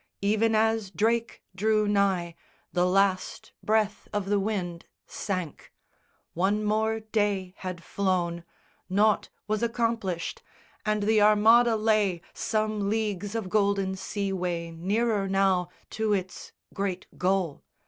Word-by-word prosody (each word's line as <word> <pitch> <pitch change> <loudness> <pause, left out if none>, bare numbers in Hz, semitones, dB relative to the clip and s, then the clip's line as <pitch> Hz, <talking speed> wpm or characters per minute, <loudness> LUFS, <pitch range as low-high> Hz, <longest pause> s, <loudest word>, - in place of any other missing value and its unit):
Even 220 +2 +2
as 220 -2 +2
Drake 225 +6 0
drew 215 +2 +2
nigh, 195 -4 +1 0.4
the 180 0 +2
last 190 0 +1
Breath 215 -1 0
of 205 -2 -2
the 205 - +3
wind 185 -5 -3 0.2
sank. 185 -6 -5 0.6
One 200 +5 +1
more 220 +1 +1
day 205 -4 -1
had 180 -2 -6
flown, 175 -3 -1 0.5
Nought 205 +3 +2 0.2
was 215 0 0
accomplished; 230 -7 -1 0.5
and 210 -1 +1
the 215 0 +3
Armada 220 +3 +6
lay 210 -5 +1
Some 215 -2 -1
leagues 210 -1 -2
of 225 -4 -2
golden 200 -1 +1
sea 195 +1 -3
way 175 -2 -2
nearer 200 +4 0
now 190 -2 +2 0.2
To 220 -1 0
its 190 -2 -4 0.2
great 195 -2 -3
goal. 185 -5 0
200 Hz, 120 wpm, -27 LUFS, 185-215 Hz, 0.6 s, Armada